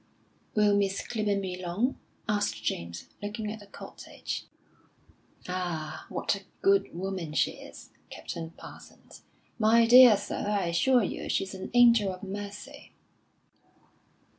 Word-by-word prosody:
"Will 210 -1 +4
Miss 195 -1 0
Clibborn 210 -4 -1
be 185 -1 -3
long?" 195 +9 -1 0.3
asked 205 - -1
James, 85 -4 -4
looking 210 +1 -4
at 220 - -7
the 205 - -14
cottage. - - -7 1.0
"Ah, 165 -4 -4
what - - -1
a 200 - -8 0.2
good 195 -3 +3
woman 185 -4 -4
she - - +2
is, - - -12 0.2
Captain 165 -1 -6
Parsons. - - -14 0.4
My 225 +1 +5
dear 245 -2 +9
sir, 205 - -4
I 200 -3 +1
assure 245 +8 +3
you - - -4
she's 195 0 -1
an 190 - -6
angel 235 -5 +6
of 185 +1 -9
mercy." 205 +1 -8
200 Hz, 130 wpm, -28 LUFS, 180-215 Hz, 1.0 s, dear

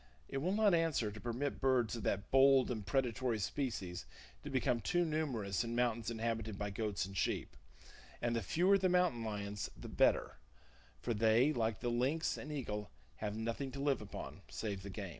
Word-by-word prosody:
It - - -4
will 175 +7 0
not 210 -3 +4
answer 165 -10 +2
to 110 - -9
permit 125 +4 -2
birds 130 -4 +2
of 115 - -5
that 100 -1 -1
bold 135 -1 +6
and 110 -4 -3
predatory 125 +2 0
species 95 -5 -3 0.4
to - - -5
become 125 -3 +1
too 175 +6 +2
numerous 125 - -1
in 115 0 -3
mountains 120 -2 +1
inhabited 110 -2 -2
by 105 0 -3
goats 105 -1 -1
and 95 0 -9
sheep; 90 - -1 0.6
and 120 0 0
the 115 - 0
fewer 185 - +3
the 185 -1 +2
mountain 180 -10 +2
lions 105 -2 -3
the - - -8
better, - - +2 0.7
for 120 - 0
they, 115 +6 +4
like 115 -5 -1
the 120 - 0
lynx 135 +7 +1
and 150 - -7
eagle, 105 -8 -3 0.3
have 105 -1 -3
nothing 115 +5 -2
to 140 - -5
live 140 -3 +1
upon 105 - -7
save 100 -4 -3
the 100 - -7
game. 100 0 -5
115 Hz, 185 wpm, -36 LUFS, 105-135 Hz, 0.7 s, bold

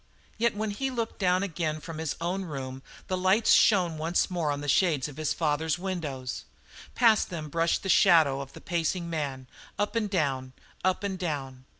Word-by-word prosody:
Yet 235 -1 +2
when 215 0 -2
he 270 +6 -2
looked 230 -3 -4
down 185 -1 +2
again 160 -4 -2
from 160 0 -8
his 160 -3 -2
own 180 +3 -2
room 135 -4 -6 0.3
the 185 - -1
lights 190 +4 +3
shone 180 -7 +4
once 170 +4 +1
more 170 -4 -1
on 145 0 -2
the 145 - -5
shades 150 -2 +2
of 145 -1 -11
his 155 -1 -1
father's 160 0 0
windows. 155 -9 -4 0.5
Past 225 -3 +4
them 160 -4 -5
brushed 165 +2 +1
the - - -4
shadow 150 -7 +5
of 135 0 -9
the - - -11
pacing 170 0 -1
man, 140 -5 -3 0.3
up 205 +2 -1
and 220 -3 0
down, 135 -8 -1 0.3
up 185 +2 +1
and 190 -2 -3
down. 135 -7 -4
165 Hz, 190 wpm, -28 LUFS, 145-190 Hz, 0.5 s, shadow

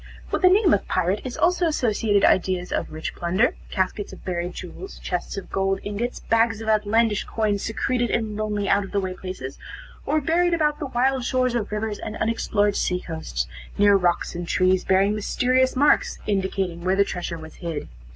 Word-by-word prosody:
With - - 0
the 365 - +7
name 385 -2 +5
of 200 - 0
pirate 185 +3 0
is 255 -2 -5
also 355 0 +2
associated 220 -8 +2
ideas 185 -1 +2
of - - -2
rich 155 0 -5
plunder, 185 +7 +1 0.2
caskets 190 +1 -2
of - - -13
buried 175 -1 -3
jewels, 285 - -8
chests 180 +2 -4
of 195 - -7
gold 195 0 0
ingots, 210 +4 -3
bags 225 -1 +2
of 225 - -7
outlandish 215 0 +2
coins, 210 -3 -1
secreted 240 +2 -1
in 220 -2 -1
lonely, 210 -1 -2
out 200 +1 +3
of 195 - -9
the 200 - +2
way 185 -1 -3
places, 185 -8 -7 0.5
or 305 +2 +2
buried 340 +4 +2
about 300 -2 +1
the 290 - -3
wild 260 +1 +1
shores 255 0 +1
of 225 -4 -2
rivers, 210 0 -2
and 215 0 -5
unexplored 210 -2 +1
sea 180 - 0
coasts, 160 - -4 0.3
near 205 0 +6
rocks 180 -3 +1
and 175 0 -5
trees 185 +1 +2
bearing 195 +2 +3
mysterious 255 +5 +1
marks, 285 +3 +3
indicating 190 -3 -1
where 185 +1 +2
the 200 0 +4
treasure 175 -2 -4
was 160 0 -10
hid. 165 -4 -4
205 Hz, 190 wpm, -24 LUFS, 185-240 Hz, 0.5 s, the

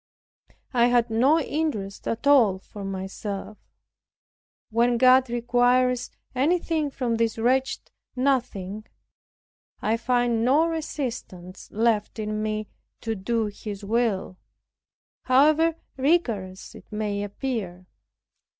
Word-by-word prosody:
I 240 -1 +4
had 240 -1 +2
no 265 +8 +4
interest 275 -11 -3
at 230 +3 -3
all 245 -10 +5
for 200 +1 -10
myself. 195 +2 -5 1.1
When 235 +2 +2
God 255 +1 +5
requires 245 +1 +2 0.2
anything 315 +2 +1
from 245 -4 -2
this 230 -1 0
wretched 260 +4 0 0.2
nothing, 220 -6 -1 0.9
I 220 +2 0
find 240 -1 +1
no 280 +7 +4
resistance 250 - -5
left 220 -1 0
in 215 0 -3
me 215 0 -2 0.3
to 225 - -2
do 220 +3 -1
His 205 -1 -7
will, 210 -4 -1 0.9
how 305 +5 +4 0.2
rigorous 230 - 0
soever - - -11
it - - -35
may 210 -1 -2
appear. 205 -4 -4
235 Hz, 105 wpm, -25 LUFS, 210-260 Hz, 1.1 s, all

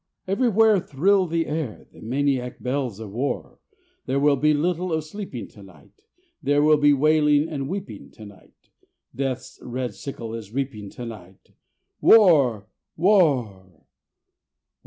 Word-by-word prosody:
Everywhere 220 0 +3
thrill 185 +4 +1
the 165 0 -1
air 150 -7 -5
The - - -16
maniac 130 +1 -1
bells 125 -5 -3
of 110 -3 -8
War. 125 +7 -4 0.5
There 135 - 0
will 145 0 +4
be 150 +3 +2
little 175 +4 -1
of 160 -1 -1
sleeping 155 - -7
to 105 - -16
night; 95 - -18 0.4
There 145 0 +2
will 155 0 +5
be 145 0 +5
wailing 150 +1 +3
and 140 -4 -5
weeping 195 +2 -7
to 110 - -12
night; 100 -2 -18 0.4
Death's 130 -1 -4
red 125 0 -4
sickle 115 -5 -7
is 110 -3 -8
reaping 125 -7 -4
to 120 - -9
night: 95 -5 -12 0.5
War! 140 - +5 0.3
War! 125 - +1
140 Hz, 135 wpm, -23 LUFS, 120-165 Hz, 0.5 s, will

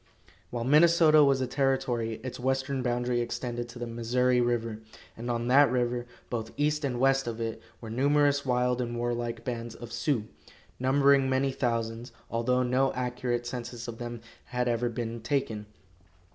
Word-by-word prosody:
While 120 -1 -3
Minnesota 155 +2 +6
was 135 -2 +3
a - - +1
territory 130 -3 0
its 130 -1 -6
western 130 +1 0
boundary 120 0 0
extended 120 0 -4
to 120 - -10
the 120 - -4
Missouri 125 +2 +1
river, 115 -2 -1 0.4
and 120 +2 -6
on 120 0 -1
that 140 +2 +6
river, 120 -1 -1 0.2
both 115 -2 -3
east 150 +1 +1
and 125 -3 -1
west 135 0 +3
of 115 -1 -4
it, 115 -1 -3 0.2
were 110 -2 -7
numerous 145 +3 +3
wild 125 -1 +1
and 120 -1 -3
warlike 120 0 -2
bands 120 -2 -4
of 120 -1 -9
Sioux, 115 0 0 0.6
numbering 135 +1 +4
many 135 +1 +1
thousands, 115 -1 -2 0.2
although 125 +2 +1
no 130 +2 +2
accurate 125 -1 -2
census 120 -1 -6
of 115 -1 -7
them 120 -1 -6 0.2
had 125 -1 -2
ever 120 0 +1
been 115 -1 -4
taken. 115 -5 -2
125 Hz, 160 wpm, -28 LUFS, 120-130 Hz, 0.6 s, Minnesota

